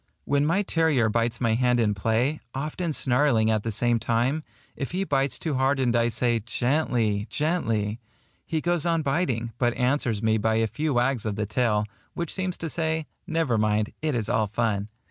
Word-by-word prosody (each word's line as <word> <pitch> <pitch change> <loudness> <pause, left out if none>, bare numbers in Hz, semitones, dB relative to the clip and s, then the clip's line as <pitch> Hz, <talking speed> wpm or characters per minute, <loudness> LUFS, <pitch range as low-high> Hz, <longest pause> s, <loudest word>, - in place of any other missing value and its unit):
When 145 +1 +2
my 190 +6 +2
terrier 160 - +2
bites 115 +1 0
my 115 -3 +2
hand 125 +1 +2
in 105 -3 +2
play, 115 +9 0 0.2
often 155 +5 -2
snarling 125 -5 +2
at 110 -1 +1
the 115 - -3
same 120 +2 +1
time, 120 +7 0 0.3
if 140 +3 -5
he 190 +2 0
bites 135 -6 0
too 160 - -3
hard 135 +1 +2
and 120 -2 +2
I 120 0 +3
say 120 0 +1
GENTLY, 115 -3 0
GENTLY, 115 -10 -1 0.4
he 160 -2 -2
goes 175 -1 +1
on 165 -2 +1
biting, 135 -6 -1
but 120 -1 +2
answers 125 -4 0
me 110 0 +2
by 110 +1 +1
a 115 0 +2
few 140 +7 -2
wags 125 -1 +1
of 105 -2 -2
the 105 0 -1
tail, 105 -1 +1 0.3
which 170 -2 -3
seems 185 -2 -3
to 165 - -4
say 160 0 -1 0.2
"Never 160 -9 +1
mind, 105 0 +1
it 155 -3 0
is 110 -3 -1
all 110 -1 +1
fun." 105 -1 -1
120 Hz, 190 wpm, -26 LUFS, 110-150 Hz, 0.4 s, I